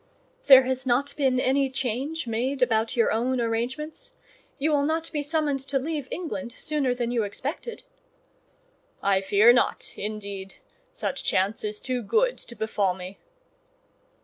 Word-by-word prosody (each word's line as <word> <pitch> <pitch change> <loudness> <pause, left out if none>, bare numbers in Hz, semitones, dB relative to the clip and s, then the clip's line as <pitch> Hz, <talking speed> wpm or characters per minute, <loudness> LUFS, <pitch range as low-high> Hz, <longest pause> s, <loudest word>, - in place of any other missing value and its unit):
"There 265 -2 +10
has 260 0 -2
not 265 +4 +1
been 265 -3 +2
any 270 +1 +2
change 265 +5 -3
made 250 +4 0
about 225 -2 +1
your 230 -2 +3
own 245 +3 0
arrangements? 240 +7 -3 0.4
You 305 +3 +1
will 290 -1 +3
not 320 +2 -1
be 300 -3 -1
summoned 290 -2 0
to 275 - 0
leave 290 0 -3
England 285 -8 -5
sooner 275 -3 -1
than 240 -1 -2
you 240 -2 +1
expected?" 285 - -5 1.2
"I 195 -1 +3
fear 205 +4 +6
not, 245 - 0
indeed: 200 -2 -6 0.4
such - - -3
chance 195 +4 0
is 210 0 -3
too 255 -2 -2
good 480 - +1
to 235 - -11
befall 210 -4 0
me." 185 +1 -9
255 Hz, 150 wpm, -26 LUFS, 220-285 Hz, 1.2 s, There